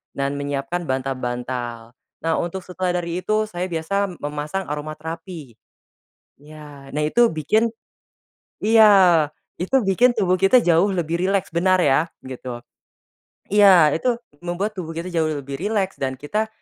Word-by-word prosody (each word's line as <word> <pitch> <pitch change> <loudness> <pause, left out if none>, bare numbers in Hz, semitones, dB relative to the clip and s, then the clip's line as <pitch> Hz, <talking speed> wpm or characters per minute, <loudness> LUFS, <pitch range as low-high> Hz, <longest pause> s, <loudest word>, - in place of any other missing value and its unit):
dan 140 +1 -2
menyiapkan 145 +5 -3
bantal-bantal. 125 -3 -4 0.3
Nah 165 0 +1
untuk 175 +2 -3
setelah 180 0 -2
dari 170 +1 -3
itu 215 +3 0
saya 180 -2 -3
biasa 180 +3 -2
memasang 150 +6 -3
aroma 150 +1 -4
terapi. 160 -4 -8 0.8
Iya 145 -2 -13
nah 150 - -3
itu 235 +10 +3
bikin 215 +10 +1 0.9
iya, 200 -7 +6 0.3
itu 180 +8 -5
bikin 235 +5 +3
tubuh 185 -4 +1
kita 195 +7 +5
jauh 175 +1 +3
lebih 170 -2 -1
rileks 195 0 0
benar 185 +2 +2
ya? 145 +1 +3 0.2
Gitu. 125 -2 -7 0.9
Iya 190 -7 +6
itu 240 +8 0 0.3
membuat 195 +5 -3
tubuh 165 -3 -5
kita 170 +2 -4
jauh 160 -2 +1
lebih 140 0 -6
rileks 200 -1 -1
dan 130 -1 -2
kita, 210 +9 -2
170 Hz, 135 wpm, -22 LUFS, 145-195 Hz, 0.9 s, iya